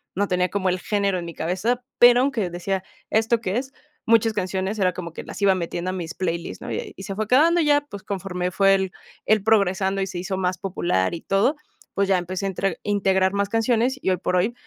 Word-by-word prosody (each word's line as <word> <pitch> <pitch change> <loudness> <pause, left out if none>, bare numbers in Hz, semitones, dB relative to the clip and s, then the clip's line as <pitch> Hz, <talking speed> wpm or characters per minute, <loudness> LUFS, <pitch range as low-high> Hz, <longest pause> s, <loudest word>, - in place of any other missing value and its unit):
no 200 +2 +1
tenía 180 -1 +1
como 190 -2 0
el 185 0 -1
género 200 0 0
en 175 - -5
mi 170 - -7
cabeza, 195 +11 -1
pero 245 0 +7
aunque 240 -9 0
decía: 185 +2 -2 0.3
"¿Esto 225 +1 +2
qué 190 -1 -1
es?", 265 +2 -4 0.3
muchas 225 0 +4
canciones, 190 +1 -2
era 185 -2 +3
como 170 -3 -7
que - - -7
las - - -9
iba 195 -1 +4
metiendo 175 0 -3
a - - -5
mis 170 -2 -5
playlist, 170 -2 -3
¿no?, - - -7
y 460 -4 -4
se 195 - -5
fue 215 +1 -2
quedando 325 +8 +4
ya, 290 -2 +4
pues 200 -1 -8
conforme 180 -2 -3
fue 195 +1 +4
el 190 -1 -1 0.3
el 215 -1 +3
progresando 195 -2 +2
y 190 - -1
se 180 -2 -5
hizo 190 +2 -3
más 185 -1 -1
popular 170 - 0
y 165 - -8
todo, 200 +10 +2 0.4
pues 200 0 +1
ya 190 - +4
empecé 185 +2 -4
a 195 - 0
intre 195 +1 -2
integrar 190 -2 +2
más 200 0 0
canciones 235 +3 +1
y - - 0
hoy 185 - +1
por 180 0 -1
hoy 190 +6 +2
195 Hz, 230 wpm, -23 LUFS, 180-220 Hz, 0.4 s, pero